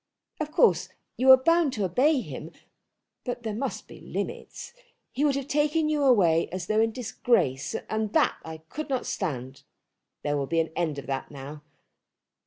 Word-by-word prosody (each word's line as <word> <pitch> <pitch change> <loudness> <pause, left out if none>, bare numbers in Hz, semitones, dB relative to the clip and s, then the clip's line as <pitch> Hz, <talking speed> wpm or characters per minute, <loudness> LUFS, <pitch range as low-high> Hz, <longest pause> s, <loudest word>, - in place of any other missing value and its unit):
Of 305 -1 -3
course 470 +9 +3 0.3
you 260 +1 +2
are 260 - +11
bound 330 +1 +3
to 210 -5 -1
obey 260 - +3
him; - - -8 0.7
but 245 -2 -4
there 220 -2 -3
must 260 +6 -4
be - - -13
limits. - - -6 0.4
He 275 - -1
would 285 -2 +3
have 275 -1 -3
taken 300 +2 +1
you 300 -1 +1
away 175 -10 +4
as 185 -1 -5
though 215 +3 +1
in 225 0 +2
disgrace, 220 - 0
and 220 -1 -2
that - - +3
I 160 -1 -8
could 310 - -6
not 260 -2 -1
stand. 135 -7 -4 0.6
There 145 0 0
will 140 -1 -1
be 165 +2 +1
an 165 0 0
end 160 -4 -1
of 140 - -6
that 135 -1 -3
now. 145 +1 -9
220 Hz, 180 wpm, -27 LUFS, -, 0.7 s, are